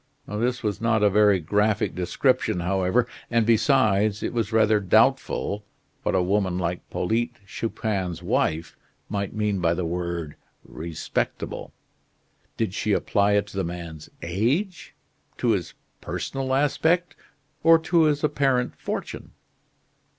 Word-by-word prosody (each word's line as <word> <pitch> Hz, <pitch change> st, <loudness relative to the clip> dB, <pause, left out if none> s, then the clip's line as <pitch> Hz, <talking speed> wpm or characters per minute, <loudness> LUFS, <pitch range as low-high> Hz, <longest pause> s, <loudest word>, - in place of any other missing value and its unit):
This 120 Hz, +4 st, -1 dB
was 105 Hz, 0 st, -2 dB
not 110 Hz, -2 st, +2 dB
a 105 Hz, -, +5 dB
very 105 Hz, -1 st, +5 dB
graphic 105 Hz, +5 st, +1 dB
description, 90 Hz, 0 st, +1 dB
however, 95 Hz, +6 st, +1 dB, 0.2 s
and, 115 Hz, -1 st, +2 dB
besides, 110 Hz, -3 st, +3 dB
it -, -, -2 dB
was 115 Hz, -2 st, -1 dB
rather 110 Hz, -1 st, +4 dB
doubtful 100 Hz, +1 st, +2 dB, 0.4 s
what -, -, 0 dB
a 90 Hz, -, +3 dB
woman 95 Hz, -1 st, +1 dB
like 90 Hz, -1 st, -2 dB
Polyte 120 Hz, +5 st, -1 dB
Chupin's 95 Hz, -5 st, -3 dB
wife 80 Hz, -1 st, 0 dB, 0.3 s
might 100 Hz, 0 st, -3 dB
mean 105 Hz, -2 st, 0 dB
by 85 Hz, -1 st, +2 dB
the 90 Hz, 0 st, -2 dB
word 85 Hz, -2 st, -3 dB, 0.3 s
"respectable." 80 Hz, 0 st, -4 dB, 0.9 s
Did -, -, -1 dB
she -, -, 0 dB
apply 100 Hz, 0 st, +2 dB
it 100 Hz, 0 st, +2 dB
to 100 Hz, -, -9 dB
the 95 Hz, -, +1 dB
man's 85 Hz, -3 st, -7 dB
age, 125 Hz, -, -1 dB, 0.4 s
to -, -, 0 dB
his -, -, -2 dB, 0.3 s
personal 135 Hz, -1 st, -3 dB
aspect, 160 Hz, +5 st, +1 dB, 0.5 s
or 165 Hz, +1 st, +7 dB
to 165 Hz, 0 st, +2 dB
his 150 Hz, -1 st, +1 dB
apparent 135 Hz, -4 st, +1 dB
fortune. -, -, -5 dB
105 Hz, 130 wpm, -25 LUFS, 90-120 Hz, 0.9 s, or